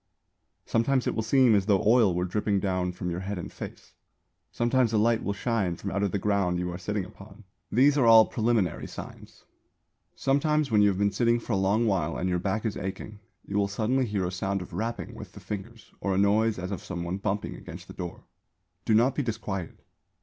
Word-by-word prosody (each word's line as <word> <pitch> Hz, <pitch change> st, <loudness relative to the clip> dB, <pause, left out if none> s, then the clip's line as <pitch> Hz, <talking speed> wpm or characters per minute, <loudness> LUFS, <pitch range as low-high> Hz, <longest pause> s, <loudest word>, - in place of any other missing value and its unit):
Sometimes 125 Hz, +3 st, +1 dB
it -, -, 0 dB
will 110 Hz, -, -1 dB
seem 125 Hz, +1 st, +4 dB
as 100 Hz, -1 st, +2 dB
though 100 Hz, -3 st, +3 dB
oil 110 Hz, -5 st, +5 dB
were 90 Hz, +1 st, 0 dB
dripping 100 Hz, +2 st, 0 dB
down 90 Hz, -2 st, -1 dB
from 90 Hz, 0 st, -4 dB
your 85 Hz, -, -3 dB
head 100 Hz, +1 st, -4 dB
and 90 Hz, -, -7 dB
face; -, -, -9 dB, 0.6 s
sometimes 120 Hz, 0 st, +2 dB
a -, -, +3 dB
light 115 Hz, +1 st, +3 dB
will 100 Hz, -, -1 dB
shine 100 Hz, -5 st, -1 dB
from 100 Hz, +3 st, -5 dB
out 100 Hz, -, -1 dB
of 100 Hz, -2 st, 0 dB
the -, -, 0 dB
ground 100 Hz, -3 st, +1 dB
you 90 Hz, 0 st, -2 dB
are 85 Hz, -, -5 dB
sitting 100 Hz, +1 st, -2 dB
upon. 100 Hz, +3 st, -14 dB, 0.3 s
These 140 Hz, +5 st, +4 dB
are 120 Hz, -, +4 dB
all 110 Hz, -1 st, +9 dB
preliminary 110 Hz, -6 st, 0 dB
signs. -, -, -11 dB, 0.7 s
Sometimes 145 Hz, +1 st, +1 dB
when 105 Hz, -1 st, +5 dB
you 105 Hz, -, +6 dB
have 100 Hz, -2 st, +1 dB
been 100 Hz, 0 st, +2 dB
sitting 120 Hz, +2 st, +2 dB
for 115 Hz, -, -4 dB
a -, -, +3 dB
long 100 Hz, +4 st, +2 dB
while 85 Hz, -7 st, 0 dB
and 90 Hz, -, -1 dB
your 90 Hz, -1 st, 0 dB
back 100 Hz, +4 st, -2 dB
is 105 Hz, -2 st, -1 dB
aching, 100 Hz, +3 st, -6 dB, 0.3 s
you 100 Hz, +1 st, -1 dB
will 100 Hz, -, +2 dB
suddenly 120 Hz, +6 st, 0 dB
hear 100 Hz, -3 st, -1 dB
a 90 Hz, -, -2 dB
sound 95 Hz, +1 st, -2 dB
of 90 Hz, -, -14 dB
rapping 115 Hz, +6 st, -4 dB
with -, -, -10 dB
the -, -, -10 dB
fingers 110 Hz, +3 st, -8 dB
or 95 Hz, -1 st, -1 dB
a -, -, 0 dB
noise 105 Hz, +3 st, +3 dB
as 90 Hz, +1 st, -5 dB
of 100 Hz, -, -5 dB
some 85 Hz, -2 st, -5 dB
one 85 Hz, +2 st, -3 dB
bumping 100 Hz, 0 st, -2 dB
against -, -, -10 dB
the -, -, -10 dB
door. 85 Hz, -1 st, -7 dB, 0.6 s
Do 110 Hz, -, +3 dB
not 120 Hz, +4 st, +4 dB
be 145 Hz, -, -1 dB
disquieted. 105 Hz, -, -4 dB
105 Hz, 225 wpm, -27 LUFS, 95-115 Hz, 0.7 s, all